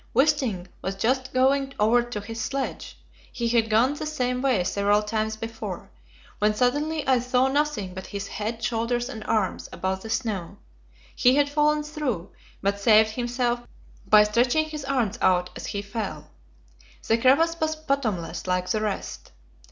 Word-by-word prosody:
Wisting 265 Hz, -, +2 dB, 0.2 s
was 190 Hz, +1 st, -3 dB
just 255 Hz, +6 st, 0 dB
going 270 Hz, +1 st, +2 dB
over 225 Hz, +3 st, +4 dB
to 240 Hz, -3 st, -5 dB
his 225 Hz, +2 st, -6 dB
sledge 275 Hz, -1 st, -4 dB, 0.3 s
he 240 Hz, -2 st, -2 dB
had 230 Hz, -1 st, +2 dB
gone 230 Hz, +6 st, +3 dB
the 295 Hz, -, -5 dB
same 250 Hz, -4 st, -1 dB
way 255 Hz, -9 st, +2 dB
several 205 Hz, +3 st, +2 dB
times 220 Hz, +1 st, -1 dB
before 225 Hz, +1 st, -6 dB, 0.5 s
when 210 Hz, 0 st, +2 dB
suddenly 290 Hz, +6 st, 0 dB
I 260 Hz, -2 st, +4 dB
saw 250 Hz, +1 st, +2 dB
nothing 265 Hz, -9 st, -1 dB
but 185 Hz, 0 st, -7 dB
his 200 Hz, -1 st, -5 dB
head, 225 Hz, +3 st, -4 dB
shoulders 240 Hz, +1 st, -1 dB
and 220 Hz, -, -7 dB
arms 215 Hz, -4 st, -1 dB
above 190 Hz, 0 st, -2 dB
the 225 Hz, -, -8 dB
snow. 210 Hz, -8 st, -3 dB, 0.6 s
He 250 Hz, +1 st, +4 dB
had 285 Hz, 0 st, +2 dB
fallen 300 Hz, 0 st, +2 dB
through, 295 Hz, -, -3 dB, 0.3 s
but 200 Hz, +1 st, 0 dB
saved 215 Hz, +1 st, +5 dB
himself 240 Hz, +1 st, -1 dB, 0.5 s
by 210 Hz, 0 st, +7 dB
stretching 245 Hz, +8 st, +2 dB
his 305 Hz, -2 st, -6 dB
arms 245 Hz, -5 st, 0 dB
out 180 Hz, -1 st, +2 dB
as -, -, -6 dB
he 200 Hz, 0 st, -3 dB
fell. 215 Hz, +2 st, -5 dB, 0.8 s
The 225 Hz, +1 st, +3 dB
crevasse 325 Hz, +7 st, +3 dB
was 315 Hz, 0 st, 0 dB
bottomless, 260 Hz, -, -2 dB
like 180 Hz, 0 st, 0 dB
the 215 Hz, -2 st, 0 dB
rest. 210 Hz, -2 st, -4 dB
235 Hz, 160 wpm, -25 LUFS, 210-270 Hz, 0.8 s, by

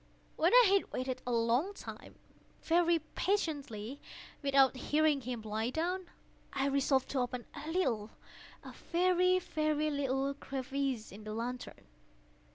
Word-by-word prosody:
When -, -, +3 dB
I -, -, +8 dB
had 395 Hz, -, +2 dB
waited 255 Hz, 0 st, -3 dB
a -, -, 0 dB
long 240 Hz, -, +1 dB
time, -, -, -9 dB, 0.5 s
very 340 Hz, 0 st, +3 dB, 0.2 s
patiently, 285 Hz, -, -2 dB, 0.4 s
without 275 Hz, -2 st, +4 dB
hearing 295 Hz, +2 st, +2 dB
him 240 Hz, -2 st, -5 dB
lie 220 Hz, +2 st, -2 dB
down, 350 Hz, +6 st, -2 dB, 0.4 s
I 270 Hz, -, 0 dB
resolved 270 Hz, -1 st, +2 dB
to 275 Hz, -, -1 dB
open 245 Hz, -1 st, -2 dB
a 310 Hz, -, -7 dB
little—a 245 Hz, -, -4 dB
very, 365 Hz, +1 st, +2 dB
very 310 Hz, -3 st, 0 dB
little 275 Hz, -1 st, 0 dB
crevice 270 Hz, -3 st, -3 dB
in 205 Hz, +3 st, -10 dB
the 215 Hz, 0 st, -5 dB
lantern. 245 Hz, +2 st, -5 dB
275 Hz, 130 wpm, -33 LUFS, 250-320 Hz, 0.5 s, I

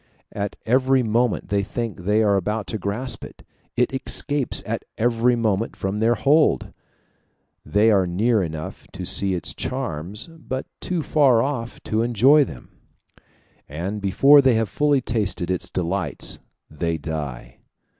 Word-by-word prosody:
At 100 Hz, 0 st, -4 dB
every 130 Hz, +2 st, +3 dB
moment 115 Hz, +1 st, 0 dB
they 100 Hz, 0 st, +1 dB
think 105 Hz, -3 st, -5 dB
they 105 Hz, +2 st, +3 dB
are 100 Hz, -2 st, +3 dB
about 105 Hz, +3 st, -1 dB
to 110 Hz, -, -3 dB
grasp 110 Hz, +7 st, -3 dB
it; -, -, -12 dB, 0.3 s
it 125 Hz, +2 st, +2 dB
escapes 140 Hz, +1 st, -1 dB
at -, -, -3 dB
every 120 Hz, +1 st, +2 dB
moment 110 Hz, -2 st, 0 dB
from 95 Hz, +2 st, -3 dB
their 115 Hz, +2 st, +3 dB
hold. 150 Hz, +5 st, +2 dB, 0.9 s
They 105 Hz, +3 st, +3 dB
are 95 Hz, -3 st, +3 dB
near 105 Hz, +5 st, +2 dB
enough 80 Hz, -3 st, -6 dB
to 95 Hz, -1 st, -6 dB
see 95 Hz, +1 st, +2 dB
its 85 Hz, -, -3 dB
charms, 105 Hz, -, -4 dB
but 155 Hz, -5 st, -6 dB
too 175 Hz, -3 st, -2 dB
far 135 Hz, -8 st, +4 dB
off 130 Hz, -4 st, -4 dB
to 110 Hz, +1 st, 0 dB
enjoy 125 Hz, +6 st, +5 dB
them; 65 Hz, -, -9 dB, 1.0 s
and 90 Hz, +8 st, -4 dB
before 135 Hz, +9 st, +6 dB
they 130 Hz, -3 st, +4 dB
have 110 Hz, -2 st, 0 dB
fully 145 Hz, -2 st, +2 dB
tasted 100 Hz, -7 st, -2 dB
its 90 Hz, -, -2 dB
delights 90 Hz, +2 st, -2 dB, 0.3 s
they 85 Hz, +1 st, -2 dB
die. 70 Hz, -6 st, -6 dB
110 Hz, 145 wpm, -23 LUFS, 95-125 Hz, 1.0 s, before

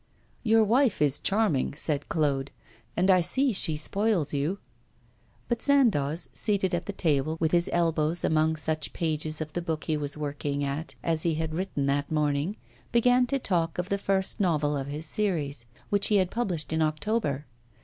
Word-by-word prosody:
'Your 225 Hz, -1 st, +4 dB
wife 235 Hz, +1 st, +2 dB
is 145 Hz, -2 st, +2 dB
charming,' 195 Hz, -11 st, +1 dB
said 150 Hz, -2 st, -1 dB
Claude, 140 Hz, -4 st, 0 dB, 0.5 s
'and 185 Hz, +2 st, +4 dB
I 185 Hz, -1 st, +5 dB
see 265 Hz, -, +1 dB
she 160 Hz, -5 st, +3 dB
spoils 190 Hz, -1 st, +1 dB
you.' 145 Hz, +7 st, -1 dB, 0.9 s
But 235 Hz, -, -1 dB
Sandoz, 175 Hz, -, +3 dB
seated 200 Hz, -4 st, 0 dB
at 175 Hz, 0 st, -2 dB
his 205 Hz, -, -4 dB
table, 155 Hz, -2 st, 0 dB
with 160 Hz, -1 st, +1 dB
his 175 Hz, 0 st, +3 dB
elbows 165 Hz, -1 st, +1 dB
among 160 Hz, 0 st, +2 dB
such 155 Hz, 0 st, -2 dB
pages 155 Hz, -1 st, -2 dB
of 155 Hz, -1 st, -5 dB
the 175 Hz, -, -2 dB
book 160 Hz, -2 st, -3 dB
he 160 Hz, -, -1 dB
was 145 Hz, 0 st, -3 dB
working 145 Hz, -1 st, -3 dB
at 140 Hz, +4 st, -4 dB
as 165 Hz, -2 st, 0 dB
he 165 Hz, -1 st, 0 dB
had 160 Hz, 0 st, -3 dB
written 165 Hz, -5 st, -2 dB
that 140 Hz, +1 st, 0 dB
morning, 150 Hz, +5 st, 0 dB, 0.3 s
began 245 Hz, +1 st, +4 dB
to 275 Hz, -, 0 dB
talk 170 Hz, -9 st, -1 dB
of 180 Hz, +1 st, -3 dB
the 200 Hz, -, 0 dB
first 195 Hz, -1 st, -1 dB
novel 150 Hz, -6 st, +1 dB
of 135 Hz, -1 st, -3 dB
his 150 Hz, +3 st, -4 dB
series, 150 Hz, -, -1 dB, 0.2 s
which 200 Hz, -1 st, +3 dB
he 210 Hz, -, +2 dB
had 185 Hz, -2 st, +2 dB
published 180 Hz, -10 st, -2 dB
in 160 Hz, -, +1 dB
October. 155 Hz, -1 st, -1 dB
160 Hz, 180 wpm, -27 LUFS, 150-195 Hz, 0.9 s, I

